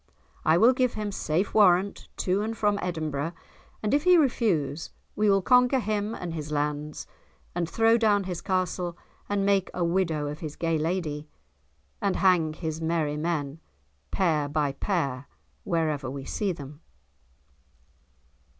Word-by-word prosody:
I 160 Hz, +1 st, +4 dB
will 230 Hz, +7 st, +6 dB
give 255 Hz, -1 st, +1 dB
him 210 Hz, -1 st, -3 dB
safe 180 Hz, 0 st, -1 dB
warrant 195 Hz, -1 st, +3 dB
to 190 Hz, +2 st, +1 dB
and 225 Hz, +1 st, -3 dB
from 205 Hz, -1 st, +1 dB
Edinburgh, 160 Hz, -3 st, -2 dB, 0.5 s
and 210 Hz, -, 0 dB
if 290 Hz, +1 st, +3 dB
he 360 Hz, -1 st, +6 dB
refuse 175 Hz, -, +1 dB, 0.3 s
we 210 Hz, 0 st, +2 dB
will 195 Hz, -1 st, +3 dB
conquer 250 Hz, +3 st, +5 dB
him 215 Hz, 0 st, -2 dB
and 175 Hz, -2 st, -5 dB
his 150 Hz, -2 st, -5 dB
lands, 150 Hz, 0 st, -2 dB, 0.5 s
and 170 Hz, -1 st, -2 dB
throw 225 Hz, +1 st, +3 dB
down 205 Hz, -3 st, +3 dB
his 180 Hz, -2 st, -5 dB
castle, 180 Hz, -2 st, -1 dB, 0.3 s
and 200 Hz, -1 st, 0 dB
make 200 Hz, -2 st, +2 dB
a 175 Hz, -, 0 dB
widow 170 Hz, -3 st, 0 dB
of 150 Hz, +1 st, -5 dB
his 155 Hz, -3 st, -6 dB
gay 165 Hz, -1 st, 0 dB
lady; 155 Hz, -2 st, -2 dB, 0.7 s
and 200 Hz, -2 st, +1 dB
hang 175 Hz, -5 st, +3 dB
his 160 Hz, 0 st, -4 dB
merry 160 Hz, -2 st, 0 dB
men 150 Hz, -2 st, -2 dB, 0.5 s
pair 155 Hz, -6 st, +1 dB
by 145 Hz, -1 st, 0 dB
pair 140 Hz, -4 st, -2 dB, 0.4 s
wherever 155 Hz, -6 st, 0 dB
we 135 Hz, 0 st, -6 dB
see 205 Hz, -3 st, -1 dB
them." 145 Hz, -2 st, -9 dB
175 Hz, 150 wpm, -27 LUFS, 150-205 Hz, 0.7 s, will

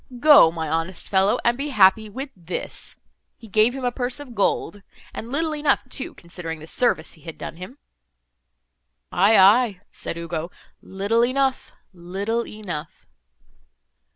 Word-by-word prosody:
Go, 290 Hz, -, +7 dB
my 160 Hz, -1 st, -4 dB
honest 165 Hz, +3 st, -3 dB
fellow, 195 Hz, +1 st, +3 dB
and 235 Hz, -, +3 dB
be 280 Hz, +3 st, -3 dB
happy 215 Hz, -2 st, +4 dB
with 265 Hz, +6 st, -7 dB
this.' 175 Hz, -1 st, -6 dB, 0.4 s
He 225 Hz, -, -14 dB
gave 220 Hz, +4 st, +3 dB
him 265 Hz, -2 st, -4 dB
a 245 Hz, -, +1 dB
purse 245 Hz, +2 st, -3 dB
of 280 Hz, -4 st, -10 dB
gold—and 205 Hz, +2 st, -3 dB
little 315 Hz, +2 st, 0 dB
enough 295 Hz, -3 st, +1 dB
too, 260 Hz, -, -4 dB
considering 170 Hz, -1 st, -6 dB
the 155 Hz, -, -11 dB
service 165 Hz, -3 st, 0 dB
he 160 Hz, -, -15 dB
had 165 Hz, +1 st, -9 dB
done -, -, -7 dB
him." 185 Hz, +10 st, -10 dB, 1.3 s
"Aye, 205 Hz, +4 st, +4 dB
aye," 200 Hz, 0 st, +5 dB
said -, -, -6 dB
Ugo, 170 Hz, 0 st, -4 dB, 0.3 s
"little 200 Hz, +5 st, 0 dB
enough—little 230 Hz, -5 st, -2 dB
enough." 185 Hz, -8 st, -7 dB
205 Hz, 140 wpm, -23 LUFS, 175-250 Hz, 1.3 s, Go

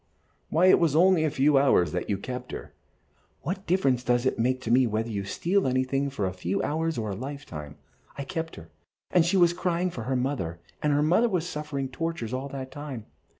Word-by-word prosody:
"Why, 170 Hz, +3 st, +3 dB
it 185 Hz, -, +7 dB
was 160 Hz, -4 st, +2 dB
only 180 Hz, 0 st, +5 dB
a -, -, +2 dB
few 140 Hz, 0 st, +4 dB
hours 90 Hz, -, +3 dB
that -, -, -3 dB
you 100 Hz, -, +1 dB
kept 125 Hz, +5 st, -6 dB
her." -, -, -7 dB, 0.7 s
"What 190 Hz, +3 st, -4 dB
difference 135 Hz, -9 st, +2 dB
does 120 Hz, 0 st, +1 dB
it 130 Hz, -, 0 dB
make 130 Hz, +2 st, 0 dB
whether 115 Hz, -2 st, +2 dB
you 100 Hz, -2 st, -3 dB
steal 180 Hz, -, 0 dB
anything 130 Hz, +2 st, 0 dB
for 120 Hz, -8 st, -2 dB
a 95 Hz, -, -2 dB
few 90 Hz, +1 st, -2 dB
hours 160 Hz, +2 st, -1 dB
or 110 Hz, -3 st, -2 dB
a -, -, -3 dB
lifetime? 105 Hz, -, -7 dB, 0.4 s
I 140 Hz, -, -3 dB
kept 165 Hz, +2 st, -4 dB
her, 80 Hz, 0 st, -12 dB, 0.4 s
and 175 Hz, -, +5 dB
she 180 Hz, +4 st, +2 dB
was 175 Hz, -1 st, +5 dB
crying 180 Hz, 0 st, 0 dB
for 115 Hz, -8 st, -6 dB
her 130 Hz, +1 st, 0 dB
mother, 125 Hz, -, -2 dB, 0.2 s
and 150 Hz, -, +2 dB
her 145 Hz, +1 st, +3 dB
mother 180 Hz, +10 st, +3 dB
was 180 Hz, -4 st, -1 dB
suffering 150 Hz, -4 st, -3 dB
tortures 130 Hz, -3 st, -4 dB
all 130 Hz, +2 st, -3 dB
that 130 Hz, -1 st, -6 dB
time. 140 Hz, -6 st, -7 dB
135 Hz, 205 wpm, -27 LUFS, 120-165 Hz, 0.7 s, it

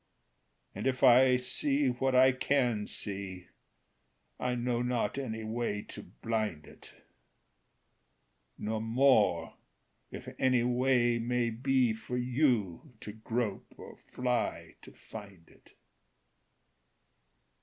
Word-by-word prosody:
And 105 Hz, +6 st, -3 dB
if 130 Hz, -1 st, -1 dB
I 130 Hz, 0 st, +7 dB
see 140 Hz, +2 st, 0 dB
what 130 Hz, +1 st, 0 dB
I 130 Hz, +1 st, +7 dB
can 125 Hz, -5 st, 0 dB
see, 95 Hz, -3 st, -6 dB, 0.9 s
I 125 Hz, 0 st, -1 dB
know 120 Hz, 0 st, -1 dB
not 125 Hz, 0 st, -1 dB
any 110 Hz, -4 st, -4 dB
way 110 Hz, -2 st, -3 dB
to -, -, -8 dB
blind 105 Hz, -, -4 dB
it; -, -, -15 dB, 1.7 s
Nor 110 Hz, +1 st, -3 dB
more 115 Hz, -7 st, +2 dB, 0.5 s
if -, -, -9 dB
any 130 Hz, -2 st, +3 dB
way 125 Hz, -1 st, +2 dB
may 120 Hz, 0 st, 0 dB
be 125 Hz, 0 st, +1 dB
For 120 Hz, +3 st, -5 dB
you 125 Hz, -, 0 dB
to 105 Hz, -, -7 dB
grope 110 Hz, -1 st, -4 dB
or -, -, -11 dB
fly 125 Hz, -1 st, -3 dB
to -, -, -14 dB
find 100 Hz, -6 st, -12 dB
it. -, -, -23 dB
120 Hz, 110 wpm, -31 LUFS, 110-125 Hz, 1.7 s, I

